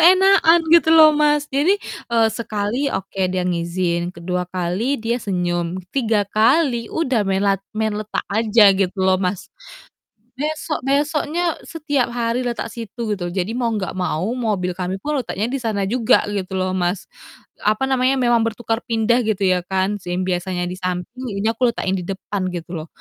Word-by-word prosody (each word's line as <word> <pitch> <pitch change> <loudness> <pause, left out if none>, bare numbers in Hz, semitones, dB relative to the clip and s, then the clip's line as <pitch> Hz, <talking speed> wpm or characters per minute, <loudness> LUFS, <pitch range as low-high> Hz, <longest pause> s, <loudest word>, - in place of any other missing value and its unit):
Keenakan 365 -1 +6
gitu 335 -1 +6
loh, 310 -1 +8
Mas. 295 0 +2
Jadi, 310 +9 +3 0.4
eee, 225 -1 +4
sekali 220 +4 -2
oke, 195 +1 -4
dia 185 -1 -1
ngizin, 170 0 -1
ke-2 180 +1 -2
kali 185 +9 -1
dia 230 +2 0
senyum, 175 -3 -2
ke-3 225 -6 +1
kali 235 +1 +2
udah 260 -8 0
melat 195 0 +1 0.2
main 220 -1 0
letak 215 0 -4
aja 220 0 +4
gitu 190 0 0
loh, 190 0 +4
Mas. 180 0 -2 0.9
Besok-besoknya 305 +2 -1
setiap 290 -6 -1
hari 235 0 -1
letak 240 -3 -3
situ 230 -1 -4
gitu. 175 -3 -4
Jadi 185 +4 -2
mau 240 -1 0
nggak 200 -4 -3
mau 180 -2 -2
mobil 210 -7 -1
kami 185 +1 -3
pun 290 +7 -2
letaknya 215 -2 -3
di 275 - -2
sana 210 -4 -1
juga 230 +2 +3
gitu 190 -2 -3
loh, 185 0 -1
Mas. 175 +1 -1 0.6
Apa 215 +5 +1
namanya 265 0 +2
memang 240 -2 +3
bertukar 225 0 -2
pindah 230 +1 +2
gitu 215 -4 0
ya 185 -1 +2
kan, 190 +2 0
sim 175 +1 -3
biasanya 180 0 -2
di - - -4
samping 185 +7 -4 0.2
ini 215 - -3
aku 235 +2 +2
letakin 190 - -2
di - - -4
depan 195 0 -3
gitu 175 0 -6
loh. 155 - -10
215 Hz, 165 wpm, -20 LUFS, 185-255 Hz, 0.9 s, loh